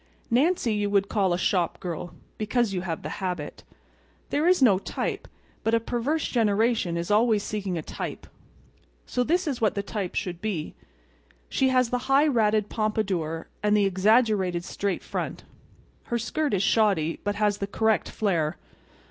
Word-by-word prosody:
Nancy 260 Hz, -1 st, +2 dB
you 205 Hz, -1 st, 0 dB
would 200 Hz, -1 st, +2 dB
call 195 Hz, -4 st, +1 dB
a 175 Hz, -, +2 dB
shop 180 Hz, -1 st, 0 dB
girl—because 205 Hz, +6 st, -3 dB
you 180 Hz, -, -1 dB
have 165 Hz, -4 st, -4 dB
the 155 Hz, -, -5 dB
habit. 180 Hz, -5 st, -4 dB, 0.7 s
There 300 Hz, +4 st, +2 dB
is 365 Hz, 0 st, +5 dB
no 215 Hz, -8 st, +5 dB
type; -, -, -4 dB, 0.4 s
but 225 Hz, +1 st, +2 dB
a -, -, +3 dB
perverse 245 Hz, +7 st, -1 dB
generation 220 Hz, -5 st, +1 dB
is 170 Hz, +3 st, -3 dB
always 215 Hz, -1 st, +3 dB
seeking 200 Hz, -5 st, -3 dB
a 160 Hz, -, -4 dB
type; -, -, -6 dB, 0.8 s
so 250 Hz, -, 0 dB
this 345 Hz, +6 st, +1 dB
is 270 Hz, -5 st, -2 dB
what 215 Hz, -, +2 dB
the 200 Hz, -, -1 dB
type 200 Hz, -3 st, -4 dB
should 180 Hz, -2 st, -3 dB
be. 195 Hz, -8 st, -3 dB, 0.8 s
She 265 Hz, -, +2 dB
has 255 Hz, -2 st, +2 dB
the 250 Hz, -, +1 dB
high 275 Hz, +2 st, +5 dB
ratted 215 Hz, -6 st, +2 dB
pompadour, 195 Hz, -8 st, -1 dB
and 210 Hz, 0 st, +3 dB
the 205 Hz, -, +3 dB
exaggerated 195 Hz, -2 st, +2 dB
straight 200 Hz, -1 st, -2 dB
front. -, -, -4 dB, 0.6 s
Her 235 Hz, -, -1 dB
skirt 280 Hz, +3 st, -1 dB
is 190 Hz, -, +1 dB
shoddy, 195 Hz, -8 st, +2 dB
but 205 Hz, 0 st, -1 dB
has 205 Hz, -1 st, +1 dB
the 200 Hz, -, -2 dB
correct 220 Hz, +1 st, +1 dB
flare. 170 Hz, -7 st, 0 dB
210 Hz, 165 wpm, -26 LUFS, 185-230 Hz, 0.8 s, is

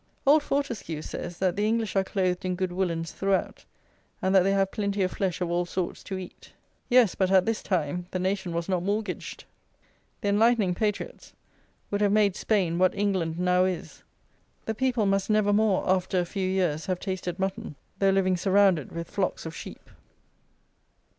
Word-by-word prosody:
Old 295 Hz, +3 st, +6 dB
Fortescue 235 Hz, -, -3 dB
says 175 Hz, 0 st, -6 dB
that 185 Hz, -1 st, 0 dB
"the 205 Hz, +1 st, +1 dB
English 225 Hz, -2 st, 0 dB
are 195 Hz, -, +3 dB
clothed 185 Hz, -2 st, -1 dB
in 185 Hz, -1 st, -1 dB
good 185 Hz, 0 st, -2 dB
woollens 170 Hz, -3 st, -2 dB
throughout," 195 Hz, -1 st, -1 dB, 0.5 s
and 190 Hz, +1 st, 0 dB
that 190 Hz, -, +7 dB
they 195 Hz, +2 st, +2 dB
have 195 Hz, -1 st, +1 dB
"plenty 200 Hz, -1 st, -1 dB
of 185 Hz, -, 0 dB
flesh 185 Hz, -3 st, -2 dB
of 175 Hz, -1 st, -1 dB
all 175 Hz, +1 st, +1 dB
sorts 180 Hz, -1 st, -3 dB
to 190 Hz, -, -4 dB
eat." 185 Hz, -1 st, -10 dB, 0.4 s
Yes; 245 Hz, -6 st, +5 dB
but 190 Hz, -1 st, +1 dB
at 190 Hz, -1 st, +5 dB
this 225 Hz, -1 st, -1 dB
time 175 Hz, -1 st, -2 dB
the -, -, -3 dB
nation 190 Hz, 0 st, -1 dB
was 170 Hz, 0 st, -2 dB
not 185 Hz, -2 st, 0 dB
mortgaged. 205 Hz, +3 st, -3 dB, 0.8 s
The 205 Hz, -, 0 dB
"enlightening" 210 Hz, -2 st, +3 dB
patriots 215 Hz, -, -3 dB, 0.6 s
would 205 Hz, 0 st, 0 dB
have 205 Hz, -1 st, +3 dB
made 205 Hz, -2 st, +3 dB
Spain 185 Hz, -7 st, 0 dB
what 185 Hz, 0 st, +3 dB
England 185 Hz, -5 st, 0 dB
now 180 Hz, +1 st, +3 dB
is. 185 Hz, -2 st, -4 dB, 0.6 s
The 220 Hz, -, -1 dB
people 245 Hz, -2 st, 0 dB
must 195 Hz, 0 st, +1 dB
never 215 Hz, -1 st, +3 dB
more, 210 Hz, -2 st, +2 dB
after 185 Hz, 0 st, +1 dB
a 175 Hz, -, 0 dB
few 185 Hz, +1 st, -2 dB
years, 175 Hz, -5 st, 0 dB
have 185 Hz, -1 st, -1 dB
tasted 185 Hz, -2 st, -4 dB
mutton, 195 Hz, -2 st, -3 dB, 0.2 s
though 195 Hz, -, +4 dB
living 190 Hz, -1 st, +2 dB
surrounded 190 Hz, -4 st, +3 dB
with 170 Hz, 0 st, -5 dB
flocks 190 Hz, -4 st, -2 dB
of 160 Hz, -1 st, -6 dB
sheep. -, -, -9 dB
190 Hz, 180 wpm, -27 LUFS, 180-205 Hz, 0.8 s, that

